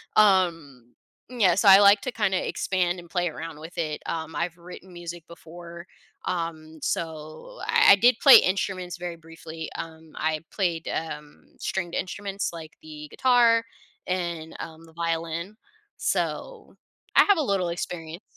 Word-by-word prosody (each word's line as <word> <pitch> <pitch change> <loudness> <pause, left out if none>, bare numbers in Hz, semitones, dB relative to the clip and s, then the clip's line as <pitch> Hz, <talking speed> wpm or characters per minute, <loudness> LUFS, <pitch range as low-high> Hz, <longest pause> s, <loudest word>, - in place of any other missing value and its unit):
Um, 165 - +2 0.4
yeah, 205 -9 +3
so 200 +1 +2
I 195 +1 +10
like 200 0 +6
to 255 - -3
kinda 200 -5 0
expand 180 -1 -1
and 170 -1 -13
play 175 -2 0
around 160 -1 -8
with 165 +3 -11
it. 155 -3 -2
Um, 160 -1 -4
I've 170 0 -2
written 180 +2 -12
music 175 -1 -8
before. 170 +1 -11 0.4
Um, 160 -2 -4
so 155 - -5
I 460 - +6
I - - +7
did 240 +4 +4
play 275 - +10
instruments 185 -2 -1
very 175 -1 -5
briefly. 165 -1 -9
Um, 160 -1 -9
I 155 0 -1
played, 170 -5 -1
um, 150 -2 -6
stringed 175 -3 -3
instruments 200 +2 -3
like 160 -2 -9
the 150 -1 -9
guitar 240 -3 +4 0.4
and, 170 -3 -3
um, 165 0 -9
the 160 - -18
violin. 165 +3 -3 0.4
So - - -3 0.4
I - - +8
have 405 -3 +4
a - - +1
little 195 -6 0
experience. 170 +1 -6
170 Hz, 150 wpm, -25 LUFS, 160-190 Hz, 0.4 s, I